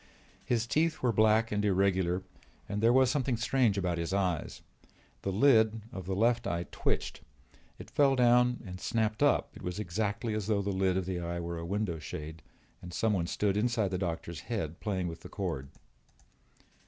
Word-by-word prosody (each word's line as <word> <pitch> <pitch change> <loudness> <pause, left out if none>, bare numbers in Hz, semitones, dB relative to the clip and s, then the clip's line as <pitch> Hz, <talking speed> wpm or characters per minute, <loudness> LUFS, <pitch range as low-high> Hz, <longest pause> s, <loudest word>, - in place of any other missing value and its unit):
His 115 -2 0
teeth 155 +7 0
were 125 - +3
black 110 +1 +3
and 105 0 0
irregular 95 -2 +1 0.4
and 105 +1 -3
there 115 +1 +5
was 130 0 +4
something 130 -3 0
strange 120 -3 +2
about 90 -3 -1
his 85 +3 -2
eyes. 90 -5 -1 0.6
The 100 - -2
lid 110 -1 +4
of 95 -2 -7
the 95 - -1
left 115 +3 +2
eye 85 0 -2
twitched; - - -2 0.6
it - - -11
fell 140 -2 +4
down 125 0 +4
and 90 -1 -8
snapped 110 -2 -1
up; - - +3
it - - -12
was 90 +1 -4
exactly 105 +3 -2
as 105 -2 -2
though 105 -2 +1
the 100 - -1
lid 95 -1 +1
of 95 - -1
the 90 -1 -3
eye 85 0 -3
were 85 0 -4
a 85 - -5
window 100 -4 -2
shade 75 +1 -7 0.4
and 90 - -9
someone 100 -3 0
stood 100 +1 0
inside 110 -2 +1
the 90 - -1
doctor's 85 -3 -3
head 90 -8 -3
playing 95 -4 -2
with 80 -1 -6
the - - -11
cord. 80 -9 -4
100 Hz, 185 wpm, -30 LUFS, 90-115 Hz, 0.6 s, there